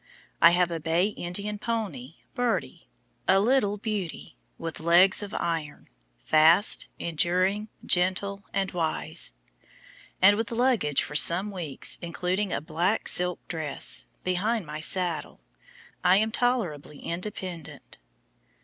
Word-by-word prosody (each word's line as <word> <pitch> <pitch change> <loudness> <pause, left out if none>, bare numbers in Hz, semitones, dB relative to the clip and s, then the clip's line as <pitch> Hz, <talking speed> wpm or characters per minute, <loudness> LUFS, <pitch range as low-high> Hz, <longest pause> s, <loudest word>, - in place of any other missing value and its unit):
I 170 - +9
have 175 0 +1
a 165 - -3
bay 165 +5 +1
Indian 205 +2 -5
pony, 190 - -4 0.2
"Birdie," 245 -1 -3 0.4
a 190 +1 +5
little 210 -2 +1
beauty, 205 -5 -5 0.2
with 165 -1 -6
legs 175 +5 +5
of 205 -1 -7
iron, 165 -3 -4 0.3
fast, 160 - +4
enduring, 185 +6 -1 0.2
gentle, 190 +2 +1
and 195 -1 -1
wise; 165 -3 -2 0.8
and 200 +2 +6
with 225 +1 -2
luggage 230 - +1
for - - -8
some 180 +7 +6
weeks, 165 -8 -3
including 180 +3 -2
a - - -2
black 170 +7 -1
silk 180 0 0
dress, 155 -4 -1 0.2
behind 195 +4 -1
my 155 +1 -7
saddle, 175 +1 0 0.6
I 180 +1 +5
am 220 +2 +1
tolerably 195 - -1
independent. 175 -1 -7
180 Hz, 120 wpm, -26 LUFS, 165-205 Hz, 0.8 s, I